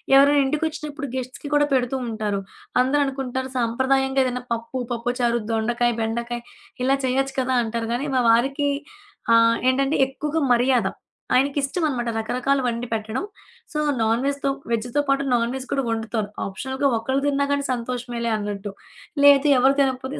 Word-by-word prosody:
ఎవరైనా 285 Hz, +1 st, +6 dB
ఇంటికొచ్చినప్పుడు 300 Hz, 0 st, -3 dB
గెస్ట్స్‌కి 255 Hz, +2 st, -5 dB
కూడా 290 Hz, 0 st, +4 dB
పెడుతూ 255 Hz, -1 st, +1 dB
ఉంటారు. 215 Hz, -3 st, -2 dB, 0.4 s
అందరూ 265 Hz, +3 st, +3 dB
అనుకుంటారు 260 Hz, -1 st, -3 dB
సాంప్రదాయంగా 265 Hz, +3 st, +1 dB
ఏదైనా 250 Hz, -1 st, -2 dB
పప్పు, 230 Hz, +2 st, -3 dB
పప్పుచారు, 240 Hz, 0 st, 0 dB
దొండకాయ, 240 Hz, +2 st, +1 dB
బెండకాయ 235 Hz, +2 st, -2 dB, 0.4 s
ఇలా 270 Hz, +2 st, +3 dB
చేయొచ్చు 265 Hz, +1 st, 0 dB
కదా! 260 Hz, 0 st, 0 dB
అంటారు. 225 Hz, 0 st, -3 dB
గానీ, 265 Hz, +4 st, -1 dB
మా 255 Hz, -, +3 dB
వారికి 270 Hz, +5 st, +2 dB, 0.7 s
ఆహ్, 230 Hz, 0 st, +5 dB
ఏంటంటే 275 Hz, +3 st, +1 dB
ఎక్కువగా 300 Hz, +4 st, -3 dB
మర్యాద. 245 Hz, -3 st, +3 dB, 0.5 s
ఆయనకి 275 Hz, +3 st, +2 dB
ఇష్టం 300 Hz, +6 st, -2 dB
అనమాట. 240 Hz, -4 st, -2 dB
రకరకాల 255 Hz, +5 st, 0 dB
వండి 235 Hz, +1 st, -2 dB
పెట్టడం. 220 Hz, -, -2 dB, 0.5 s
సో, 300 Hz, -, -1 dB, 0.2 s
నాన్‌వెజ్‌తో 275 Hz, +5 st, 0 dB, 0.2 s
వెజ్‌తో 240 Hz, +5 st, 0 dB
పాటు 275 Hz, 0 st, +2 dB
నాన్‌వెజ్ 245 Hz, +3 st, -1 dB
కూడా 275 Hz, -3 st, 0 dB
వండుతారు. 225 Hz, -2 st, -2 dB, 0.2 s
ఆప్షనల్‌గా 265 Hz, +7 st, -1 dB
ఒక్కళ్ళు 265 Hz, +4 st, -1 dB
తిన్నా 280 Hz, 0 st, +1 dB
గానీ, 280 Hz, 0 st, -1 dB
సంతోషమేలే 240 Hz, -1 st, -3 dB
అన్నట్టు. 205 Hz, -1 st, -5 dB, 0.5 s
లేదు 285 Hz, +1 st, +7 dB
ఎవరు 270 Hz, +2 st, +4 dB
తినకపోతే 265 Hz, 0 st, -1 dB
255 Hz, 140 wpm, -23 LUFS, 235-275 Hz, 0.7 s, లేదు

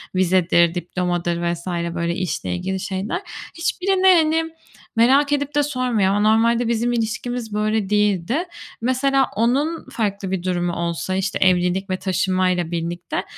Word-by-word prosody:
vizedir, 175 Hz, -2 st, +3 dB
diplomadır 175 Hz, 0 st, -2 dB, 0.2 s
vs. 170 Hz, +2 st, -9 dB, 0.3 s
böyle 170 Hz, 0 st, -1 dB
işle 160 Hz, -, -3 dB
ilgili 190 Hz, -, -3 dB
şeyler. 195 Hz, -, -3 dB, 0.4 s
Hiçbirini 375 Hz, +3 st, +1 dB
hani 325 Hz, -3 st, +4 dB, 0.5 s
merak 270 Hz, +5 st, +4 dB
edip 285 Hz, 0 st, -2 dB
de 290 Hz, -, +3 dB
sormuyor. 250 Hz, -8 st, 0 dB
Ama -, -, +1 dB
normalde 230 Hz, +1 st, +2 dB
bizim 235 Hz, +1 st, 0 dB
ilişkimiz 230 Hz, 0 st, -3 dB
böyle 215 Hz, -1 st, 0 dB
değildi. 210 Hz, -, +1 dB, 0.4 s
Mesela 265 Hz, +2 st, +2 dB
onun 275 Hz, +9 st, 0 dB
farklı 200 Hz, -4 st, -2 dB
bir 185 Hz, -2 st, -2 dB
durumu 175 Hz, -1 st, -1 dB
olsa, 170 Hz, +2 st, -2 dB
işte, 195 Hz, +2 st, -1 dB
evlilik 185 Hz, +1 st, +2 dB
ve 185 Hz, -, -1 dB
taşınmayla 185 Hz, -2 st, 0 dB
birlikte, 170 Hz, +1 st, -3 dB
200 Hz, 135 wpm, -21 LUFS, 180-250 Hz, 0.5 s, hani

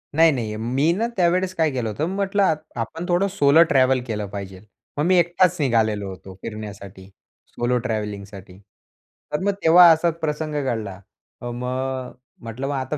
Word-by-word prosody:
नाही, 165 Hz, +1 st, +6 dB
नाही. 115 Hz, -6 st, -3 dB
मी 130 Hz, +8 st, +1 dB
ना 220 Hz, +6 st, -1 dB
त्यावेळेस 180 Hz, +1 st, +1 dB
काय 160 Hz, -3 st, +1 dB
केलं 125 Hz, -4 st, -2 dB
होतं, 110 Hz, +9 st, -2 dB
म्हटलं 200 Hz, 0 st, +1 dB
आ 185 Hz, -, +4 dB, 0.3 s
आपण 165 Hz, +9 st, -5 dB
थोडं 175 Hz, +3 st, +2 dB
सोलो 160 Hz, -4 st, +5 dB
ट्रॅव्हल 130 Hz, -1 st, +3 dB
केलं 105 Hz, -3 st, -3 dB
पाहिजे. 95 Hz, 0 st, -8 dB, 0.3 s
मग 150 Hz, -, +1 dB
मी 185 Hz, 0 st, +4 dB
एकटाच 175 Hz, +1 st, +2 dB
निघालेलो 110 Hz, -7 st, +1 dB
होतो 95 Hz, 0 st, -10 dB
फिरण्यासाठी 100 Hz, -3 st, -8 dB, 0.4 s
सोलो 120 Hz, +1 st, -1 dB
ट्रॅव्हलिंगसाठी. 100 Hz, -4 st, -6 dB, 0.8 s
तर 150 Hz, -, 0 dB
मग 200 Hz, -, +2 dB
तेव्हा 175 Hz, +2 st, +8 dB
असाच 165 Hz, 0 st, +2 dB
प्रसंग 155 Hz, -1 st, -3 dB
घडला. 110 Hz, -7 st, -3 dB, 0.4 s
अ, 120 Hz, -, -5 dB
मग 130 Hz, +1 st, -4 dB, 0.3 s
म्हटलं 115 Hz, +4 st, -5 dB
मग 145 Hz, -, -2 dB
आता 135 Hz, +2 st, -3 dB
130 Hz, 160 wpm, -22 LUFS, 110-165 Hz, 0.8 s, तेव्हा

